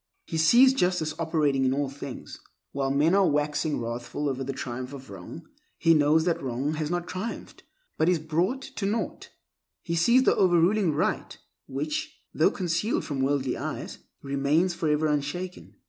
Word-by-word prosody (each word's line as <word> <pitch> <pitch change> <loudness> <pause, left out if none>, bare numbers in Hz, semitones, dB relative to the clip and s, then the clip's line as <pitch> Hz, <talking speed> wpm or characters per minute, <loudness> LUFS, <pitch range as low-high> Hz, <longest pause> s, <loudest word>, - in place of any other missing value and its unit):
He 165 - -4
sees 240 +12 +6
justice 180 -9 0
operating 150 -5 +1
in 130 0 +2
all 145 0 0
things. 140 -1 -8 0.3
While 135 -1 -1
men 145 +5 +3
are 195 -1 +4
waxing 150 0 0
wrathful 120 +5 -4
over 135 -1 -2
the 135 - -3
triumph 130 0 -5
of 130 -6 -10
wrong, 95 - -10 0.3
he 165 - +4
knows 155 +1 +3
that 175 -2 0
wrong 135 +3 -2
has 155 -1 -3
not 175 0 -2
triumphed, 200 +6 -6 0.4
but 160 - +3
is 180 - +3
brought 170 - -1
to 245 -8 -4
naught. 220 +3 -3 0.5
He 170 - -3
sees 235 +10 +4
the - - +4
overruling 180 0 +3
Right - - -1 0.3
which, 300 - -3 0.2
though - - +4
concealed 180 +4 -1
from 140 -3 -3
worldly 135 -1 0
eyes, - - -5 0.2
remains 140 +6 +1
forever 155 -2 0
unshaken. 150 +5 -3
155 Hz, 160 wpm, -27 LUFS, 140-180 Hz, 0.5 s, sees